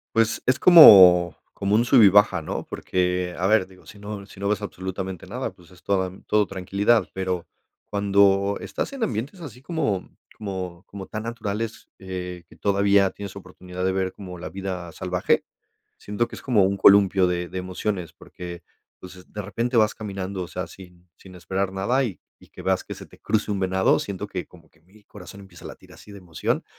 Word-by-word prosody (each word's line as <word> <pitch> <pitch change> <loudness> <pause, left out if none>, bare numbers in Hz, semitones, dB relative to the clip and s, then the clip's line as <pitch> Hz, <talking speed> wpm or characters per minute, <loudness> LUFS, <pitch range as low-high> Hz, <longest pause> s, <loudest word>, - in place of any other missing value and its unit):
Pues 115 -1 +2
es 130 +1 +2
como 90 - +9 0.2
como 100 +1 0
un 115 - +4
sube 120 -2 +6
y 100 - +8
baja, 100 -3 +4
¿no? 75 - -4
Porque, 90 -1 -2
a 90 - -1
ver 105 -2 +3
digo, 95 -1 -19
sí 100 - -14
no 105 -1 -7
sí 100 - -16
no 100 - -2
ves 105 0 0
absolutamente 95 -1 -6
nada, - - -4
pues 90 0 -21
es 90 -3 -19
toda 95 -2 0
todo 105 -1 +2
tranquilidad, 100 +3 +1
pero 95 -2 -3 0.4
cuando 100 0 +2
estás - - -4
en 270 -4 -3
ambientes 125 - -4
así 130 -5 -10
como 140 - -2 0.3
como 95 -3 -6
como 100 -1 -9
tan 110 0 -6
naturales, 115 -1 -5
eh, 90 -2 -7
que - - -18
todavía 100 -1 +2
tienes 100 0 -9
oportunidad 90 -1 -8
de 95 - +2
ver 95 0 -2
como 90 -3 -9
la 90 - -6
vida 95 -3 -6
salvaje, 90 +2 0 0.5
siento 105 +3 -2
que - - -10
es - - -11
como 110 -7 +3
un 100 +1 0
columpio 100 -1 +5
de 90 -1 -2
de 95 +2 -6
emociones, 90 -1 -4
porque, 85 -1 -10 0.4
pues, 90 0 -14
de 105 - -5
repente 115 +6 -2
vas 110 -1 +3
caminando, 100 -3 -5
o 85 - -7
sea, 90 +4 -4
así, 90 -2 -13 0.2
sin 95 -1 -15
esperar 95 +3 -3
nada 110 +8 0
y 105 -7 -5 0.2
y - - -18
que - - -12
veas - - 0
que - - -7
se - - -11
te - - -19
cruce 110 -1 -1
un 100 -1 -2
venado, 95 0 +2
siento 100 0 -5
que 95 -3 -6
como 85 -3 -20
que - - -30
mi 100 +6 -23
corazón 100 -1 -12
empieza 95 -4 -13
a - - -7
latir - - -14
así 105 - -15
de 100 - -10
emoción, 85 -4 -3
95 Hz, 200 wpm, -24 LUFS, 90-105 Hz, 0.5 s, como